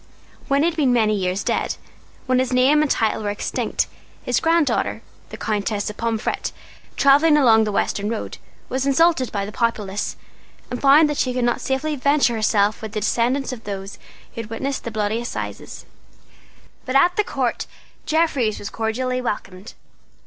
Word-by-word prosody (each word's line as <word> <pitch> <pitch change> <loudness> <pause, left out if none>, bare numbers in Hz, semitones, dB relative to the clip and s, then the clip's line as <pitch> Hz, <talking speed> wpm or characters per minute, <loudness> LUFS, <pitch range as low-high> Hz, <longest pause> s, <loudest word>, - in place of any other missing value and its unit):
When 280 +1 +2
he 335 - +4
had 335 - -7
been 275 -5 +3
many 220 -3 +3
years 190 -1 -1
dead, - - -1 0.5
when 255 -1 +2
his 260 0 0
name 260 +4 +4
and 305 - +1
title 220 -3 +1
were 210 - -2
extinct, 205 - -1 0.4
his - - +1
granddaughter, 330 -2 +1 0.3
the - - -8
Countess 210 -1 -2
of 210 - -16
Pomfret, 230 -1 -2 0.5
travelling 295 +3 +5
along 225 -6 +5
the 210 - -2
western 200 +1 -1
road, 225 -1 -5 0.3
was 265 +1 -2
insulted 280 -2 +3
by 200 -1 -2
the 205 - -7
populace, 210 -3 -2 0.6
and 245 - -4
found 285 +3 +6
that 295 -1 -3
she 255 -1 0
could 250 -1 +1
not 240 - 0
safely 290 +3 -1
venture 280 -2 +2
herself 215 -1 +1
among 220 - -5
the 215 - -1
descendants 250 +5 0
of 230 -3 -9
those 195 -1 -6 0.3
who 230 - -4
had 220 - -10
witnessed 265 +5 -3
the - - -2
Bloody 215 +1 -1
Assizes. 105 - -6 1.0
But 255 - -4
at 350 +6 +5
the 420 - +2
Court - - -2 0.4
Jeffreys 285 -9 +1
was 205 - -7
cordially 250 +3 -2
welcomed. 195 -4 -5
240 Hz, 170 wpm, -21 LUFS, 215-275 Hz, 1.0 s, found